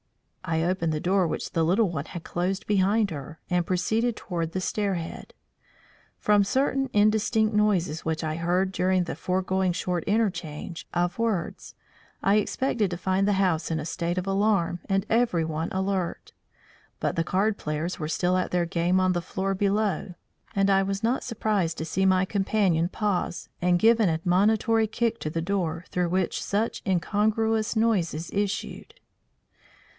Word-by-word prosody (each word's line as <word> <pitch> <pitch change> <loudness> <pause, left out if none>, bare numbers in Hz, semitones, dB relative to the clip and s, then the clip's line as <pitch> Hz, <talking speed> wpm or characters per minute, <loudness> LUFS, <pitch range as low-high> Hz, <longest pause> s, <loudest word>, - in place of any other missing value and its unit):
I 165 -2 0
opened 170 -2 0
the 155 - -1
door 185 +2 +2
which - - -4
the 165 - +1
little 190 +7 +3
one 150 -3 -3
had 170 0 -8
closed 185 +2 -2
behind 205 +1 +2
her, 150 +1 -7
and 175 -1 +1
proceeded 220 +6 0
toward 170 -5 -4
the 185 - -1
stair 200 +1 -1
head. 165 -1 -7 0.8
From 210 -1 +3
certain 270 +4 0
indistinct 215 +1 +2
noises 195 -7 +1
which 160 0 -2
I 155 -1 -1
had 165 +1 -4
heard 185 +2 +1
during 185 -1 +1
the 175 - -5
foregoing 185 0 0
short 175 -1 -2
interchange 180 -6 -2
of 175 +4 0
words, 220 -7 -2 0.5
I 200 +2 +4
expected 215 -1 0
to 175 - -4
find 190 +2 +1
the 205 - +3
house 180 -5 +1
in 160 -1 -1
a 150 - -5
state 170 +1 -2
of 185 - -1
alarm 195 -3 +1
and 195 0 +1
everyone 165 -9 +1
alert. 190 -2 -2 0.7
But - - -1
the 165 - +1
card 205 +4 0
players 155 +5 -3
were 155 - -3
still 180 +3 +1
at 185 - 0
their 175 -1 +1
game 175 +2 +1
on 185 0 +2
the 175 - -1
floor 190 +2 -2
below, 200 -2 0 0.4
and 195 0 +3
I 195 0 +4
was 195 +2 -2
not 240 +4 +1
surprised 210 -8 -1
to 160 - -3
see 190 +4 +1
my 185 0 +3
companion 190 -4 +1
pause 200 -4 -2
and 175 0 +3
give 225 +4 +4
an 210 -5 +4
admonitory 210 +7 +2
kick 230 +1 -1
to 155 - -3
the 165 +1 -2
door 175 -2 -2
through 180 -1 0
which 185 0 0
such 215 +3 -1
incongruous 215 +4 +1
noises 180 -8 0
issued. 200 - -3
185 Hz, 170 wpm, -26 LUFS, 170-210 Hz, 0.8 s, I